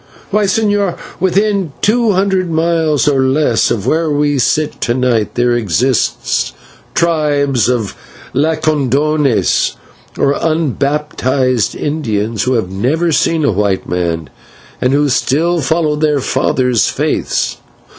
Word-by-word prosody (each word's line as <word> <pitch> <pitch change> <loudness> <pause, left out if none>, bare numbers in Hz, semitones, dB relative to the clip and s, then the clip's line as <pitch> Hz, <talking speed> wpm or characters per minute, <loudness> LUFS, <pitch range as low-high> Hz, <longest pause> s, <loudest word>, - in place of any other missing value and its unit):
Why, 210 +1 +2
señor, 205 -3 0 0.2
within 195 -3 +1
two 225 0 +3
hundred 190 -1 0
miles 160 -2 +1
or 140 -2 +3
less 130 -2 +2
of 105 -3 -2
where 160 +4 +1
we 145 -1 +1
sit 150 +5 0
to 120 - 0
night, 125 -4 0
there 120 0 +2
exist 120 +3 0 0.4
tribes 145 -7 +1
of 115 -5 -1 0.4
/Lacandones/, 150 -2 +1 0.4
or 140 - +2
unbaptised 140 -5 0
Indians, 115 -8 -2
who 130 - +1
have 110 -6 -1
never 145 - 0
seen 160 0 +1
a 140 - +3
white 100 -1 -1
man 85 -5 -2 0.5
and 125 - +2
who 145 +1 +2
still 160 +5 +1
follow 155 +1 0
their 150 -1 +1
fathers' 125 -2 +1
faiths. - - -1
145 Hz, 120 wpm, -14 LUFS, 125-160 Hz, 0.5 s, two